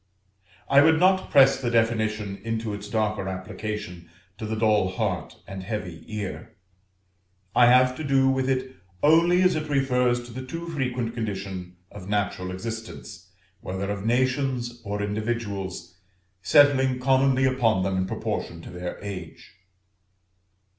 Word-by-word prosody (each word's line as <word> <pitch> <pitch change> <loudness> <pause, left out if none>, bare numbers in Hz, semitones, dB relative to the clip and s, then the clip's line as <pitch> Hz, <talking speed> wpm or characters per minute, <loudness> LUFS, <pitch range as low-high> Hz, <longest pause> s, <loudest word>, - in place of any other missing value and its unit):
I 140 +1 +6
would 160 +1 +5
not 185 +1 +3
press 135 -2 +5
the 120 - 0
definition 110 -3 0
into 115 -1 -3
its 100 0 -7
darker 105 -3 -1
application 95 -2 -6 0.3
to 110 - -4
the 110 - -2
dull 110 -3 +2
heart 95 -3 -3
and 95 -1 -7
heavy 90 -5 -5
ear; 105 -3 -6 1.0
I 120 - +7
have 125 +1 +5
to 155 - -5
do 135 -2 +3
with 130 0 +1
it 130 0 -2 0.3
only 170 +4 +5
as 185 - +4
it 155 0 -3
refers 125 -3 +1
to 120 - -11
the 130 +2 -6
too 165 +6 -6
frequent 125 -6 -2
condition 95 -5 -5 0.2
of 100 -2 -10
natural 100 -3 -1
existence, 110 -1 -7 0.3
whether 95 +2 -4
of 100 -1 -4
nations 125 0 0
or 105 -1 -3
individuals, 100 -5 -4 0.4
settling 135 0 +4
commonly 130 0 +3
upon 120 -7 +2
them 95 0 -1
in 95 0 0
proportion 85 - -4
to - - -10
their 90 0 -6
age. 95 -5 -8
115 Hz, 140 wpm, -25 LUFS, 100-130 Hz, 1.0 s, I